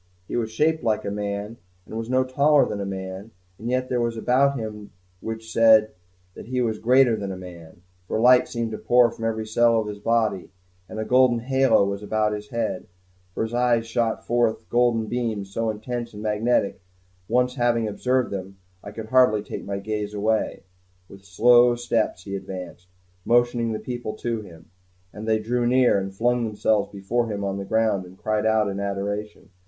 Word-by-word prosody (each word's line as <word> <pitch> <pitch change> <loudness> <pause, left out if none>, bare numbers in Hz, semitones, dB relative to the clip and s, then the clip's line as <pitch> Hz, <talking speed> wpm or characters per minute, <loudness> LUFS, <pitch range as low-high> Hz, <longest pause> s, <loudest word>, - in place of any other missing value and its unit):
He - - -5
was 115 -2 -1
shaped 155 +5 +1
like 110 -2 0
a 100 - -2
man, 105 +2 -4 0.3
and - - -10
was 115 +1 -4
no 130 0 +3
taller 140 +3 +3
than 100 - -4
a 100 - -3
man, 95 +2 -6 0.3
and 115 +3 -5
yet 130 0 0
there 125 -1 0
was 115 -1 -1
that 110 - -6
about 140 +2 +3
him 105 -2 -6 0.3
which 110 +1 -6
said 110 -1 +5 0.4
that - - -11
he 125 +1 -2
was 115 -3 -1
greater 125 0 +4
than 100 -2 -4
a 95 - -6
man, 90 -1 -12 0.2
for 110 - -1
light 125 +2 +6
seemed 115 -2 -3
to 110 - -5
pour 120 -1 +4
from 115 - -6
every 110 -1 -2
cell 115 +1 +3
of 110 - -2
his 105 -1 -6
body, 110 -3 0 0.4
and - - -8
a 110 - -2
golden 125 0 +4
halo 130 -4 +3
was 100 0 -3
about 105 0 0
his 105 0 -7
head, 115 -5 -3 0.5
and - - -1
his 115 +1 -5
eyes 120 -1 +2
shot 115 0 -1
forth 120 -2 0
golden 120 -2 +2
beams 110 -4 -3
so 115 +1 -1
intense 120 +2 -5
and 105 - -8
so 110 - 0
magnetic 105 0 +1
that, 90 +1 -26
once 125 +1 +2
having 120 -3 +1
observed 125 +4 0
them, 95 0 -6 0.3
I 100 - -7
could 110 +1 -8
hardly 125 -5 +4
take - - -7
my 100 0 -3
gaze 105 +1 -4
away. 110 +2 -1 0.5
With 100 0 -14
slow 120 +5 +5
steps 115 -5 -1
he 100 0 -5
advanced, 90 -2 -8 0.4
motioning 120 0 +2
the 110 - -3
people 120 -1 -5
to 115 0 -3
him; 85 -5 -15 0.4
and 110 +2 -8
they 110 0 +3
drew 120 +2 -1
near, 125 -4 +4
and 95 0 -4
flung 120 +4 0
themselves 105 -1 0
before 110 +4 -2
him 100 -1 -3
on 100 0 -2
the 100 - -5
ground, 110 -3 0
and 90 +1 -15
cried 110 +1 -1
out 110 -1 +2
in 100 0 -3
adoration. 100 +1 -4
110 Hz, 200 wpm, -24 LUFS, 100-120 Hz, 0.5 s, light